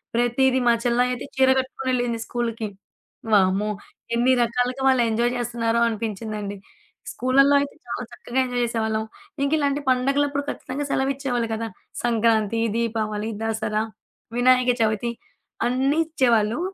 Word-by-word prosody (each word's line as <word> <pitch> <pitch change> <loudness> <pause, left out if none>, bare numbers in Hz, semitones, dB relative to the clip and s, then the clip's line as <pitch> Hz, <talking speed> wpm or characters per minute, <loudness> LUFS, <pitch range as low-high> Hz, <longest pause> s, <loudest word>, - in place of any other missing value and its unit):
ప్రతీది, 250 +2 +2
మా 235 - +6
చెల్లాయయితే 245 +1 +1
చీర 265 0 +5
కట్టుకొనెళ్ళింది 255 -3 -1
స్కూలుకి. 230 -3 -3 0.6
వామ్మో! 200 +1 +3 0.4
ఎన్ని 245 +2 +3
రకాలుగా 250 +3 -1
వాళ్ళు 260 -2 +4
ఎంజాయ్ 235 +2 +1
జేస్తున్నారో 235 -1 0
అనిపించిందండి. 215 -2 -4 0.5
స్కూళ్ళల్లో 275 +3 +4
అయితే 280 0 -3
చాలా 240 +1 -4
చక్కగా 240 +2 -3
ఎంజాయ్ 245 -1 -2
చేసేవాళ్ళం. 220 -2 -1 0.4
ఇంకా 280 - +1
ఇలాంటి 285 -1 +1
పండగలప్పుడు 280 +3 +1
ఖచ్చితంగా 290 +2 -4
సెలవు 270 0 +1
ఇచ్చేవాళ్ళు 250 -4 -2
గదా! 225 +1 -3 0.4
సంక్రాంతి, 230 -2 +2 0.2
దీపావళి, 220 -2 -1
దసరా, 220 -1 -1 0.5
వినాయక 250 0 +4
చవితి 220 +2 +1 0.6
అన్నీ 270 +5 +1
ఇచ్చేవాళ్ళు. 240 -6 +2
240 Hz, 120 wpm, -23 LUFS, 225-260 Hz, 0.6 s, మా